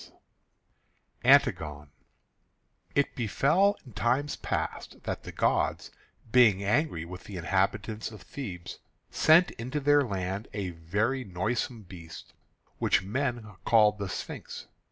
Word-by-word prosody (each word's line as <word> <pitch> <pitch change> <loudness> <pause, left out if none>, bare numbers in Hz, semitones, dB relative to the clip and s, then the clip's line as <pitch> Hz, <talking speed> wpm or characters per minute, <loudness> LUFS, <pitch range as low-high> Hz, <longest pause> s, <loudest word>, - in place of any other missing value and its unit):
II - - -18 1.1
ANTIGONE 75 -2 +3 1.0
It 140 - +2
befell 155 - +2
in 125 - -13
times 125 +8 0
past - - -4
that - - -3
the - - -8
gods, - - 0 0.4
being 110 -6 +5
angry 105 - +1
with 90 +2 -9
the 100 - -7
inhabitants 105 +5 -1
of 110 -4 -12
Thebes, 95 -11 -7 0.3
sent 165 +3 +5
into 130 +5 -2
their 145 +1 +4
land 100 -3 -3
a 100 -3 -3
very 105 +11 -1
noisome 110 +4 -2
beast 85 -3 -11 0.5
which - - +2
men 115 -2 -3
called 105 -2 +4
the 100 -1 -3
Sphinx. 90 - -6
105 Hz, 120 wpm, -29 LUFS, 95-130 Hz, 1.1 s, being